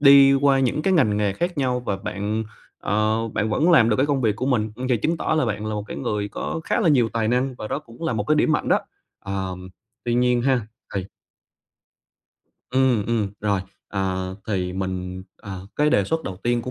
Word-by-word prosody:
đi 140 Hz, -1 st, +8 dB
qua 135 Hz, -1 st, +4 dB
những 135 Hz, +4 st, +1 dB
cái 190 Hz, -, +2 dB
ngành 110 Hz, -, +3 dB
nghề 105 Hz, -2 st, +1 dB
khác 175 Hz, -, -2 dB
nhau 125 Hz, -2 st, +1 dB
và 100 Hz, -5 st, -2 dB
bạn, 105 Hz, +3 st, -3 dB, 0.3 s
ờ, 110 Hz, +2 st, +1 dB
bạn 105 Hz, 0 st, -1 dB
vẫn 155 Hz, +11 st, +3 dB
làm 125 Hz, -10 st, +6 dB
được 105 Hz, -, +2 dB
cái 135 Hz, +2 st, +2 dB
công 140 Hz, -2 st, +1 dB
việc 110 Hz, -4 st, +1 dB
của 130 Hz, -, -2 dB
mình, 110 Hz, -5 st, +1 dB
ừ, 125 Hz, -, -5 dB
vậy 125 Hz, -, +3 dB
chứng 160 Hz, +10 st, 0 dB
tỏ 155 Hz, -, 0 dB
là 155 Hz, -, +3 dB
bạn 105 Hz, -2 st, -2 dB
là 110 Hz, -, -2 dB
một 105 Hz, -, -2 dB
cái -, -, -5 dB
người 105 Hz, -1 st, -2 dB
có 160 Hz, -, -4 dB
khá -, -, +1 dB
là -, -, +3 dB
nhiều 125 Hz, -7 st, +4 dB
tài 115 Hz, -1 st, 0 dB
năng 125 Hz, +2 st, +1 dB
và 110 Hz, -, -5 dB
đó -, -, -1 dB
cũng 120 Hz, -2 st, -14 dB
là 160 Hz, -, 0 dB
một 105 Hz, -2 st, -1 dB
cái 155 Hz, -, +4 dB
điểm 155 Hz, +1 st, +3 dB
mạnh 150 Hz, -, 0 dB
đó. -, -, +4 dB, 0.4 s
Ờm, 95 Hz, -2 st, -4 dB, 0.4 s
tuy 120 Hz, -, 0 dB
nhiên 125 Hz, 0 st, +3 dB
ha, 125 Hz, -5 st, +1 dB, 0.3 s
thì 95 Hz, -1 st, -2 dB, 1.6 s
Ừm, 130 Hz, -5 st, +2 dB
ừm, 110 Hz, -4 st, 0 dB
rồi. 100 Hz, -2 st, +1 dB, 0.3 s
À, 95 Hz, -1 st, -2 dB, 0.2 s
thì 90 Hz, -4 st, -1 dB
mình, 95 Hz, -1 st, -4 dB
ờ, 95 Hz, -3 st, -8 dB
cái 150 Hz, +1 st, +3 dB
đề 100 Hz, -, +3 dB
xuất 160 Hz, +6 st, -1 dB
đầu 95 Hz, -, -5 dB
tiên 120 Hz, 0 st, +1 dB
của 125 Hz, -, -5 dB
115 Hz, 225 wpm, -23 LUFS, 100-135 Hz, 1.6 s, đi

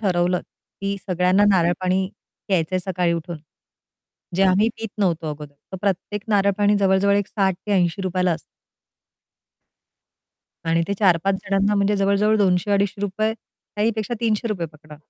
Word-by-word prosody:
ठरवलं, 180 Hz, -3 st, +1 dB, 0.4 s
की 200 Hz, 0 st, -2 dB
सगळ्यांना 185 Hz, +2 st, +3 dB
नारळ 175 Hz, -2 st, +3 dB
पाणी 185 Hz, +1 st, +1 dB, 0.4 s
घ्यायचंय 185 Hz, -1 st, +1 dB
सकाळी 180 Hz, -2 st, 0 dB
उठून. 170 Hz, +1 st, -4 dB, 1.0 s
जे 195 Hz, -, +3 dB
आम्ही 195 Hz, +3 st, +4 dB
पीत 225 Hz, -, -5 dB
नव्हतो 170 Hz, -5 st, 0 dB
अगोदर 150 Hz, -1 st, -9 dB, 0.2 s
तर -, -, -4 dB
प्रत्येक 200 Hz, +1 st, -2 dB
नारळपाणी 205 Hz, 0 st, +3 dB
जवळ-जवळ 195 Hz, +1 st, +3 dB
एक 205 Hz, -1 st, 0 dB
₹60-₹80 190 Hz, -2 st, 0 dB
ला 180 Hz, -1 st, +3 dB
असतं. 160 Hz, -, -4 dB, 2.3 s
आणि 165 Hz, +1 st, +2 dB
ते 200 Hz, -, 0 dB
4-5 190 Hz, -1 st, +3 dB
जणांना 200 Hz, +1 st, +1 dB
म्हणजे 200 Hz, 0 st, +2 dB
जवळ-जवळ 200 Hz, +2 st, +2 dB
₹200-₹250 200 Hz, +2 st, +1 dB
काही 215 Hz, -1 st, -4 dB
पेक्षा 220 Hz, +2 st, -2 dB
₹300 215 Hz, -5 st, -1 dB
पकडा. 155 Hz, 0 st, -14 dB
195 Hz, 125 wpm, -22 LUFS, 180-205 Hz, 2.3 s, आम्ही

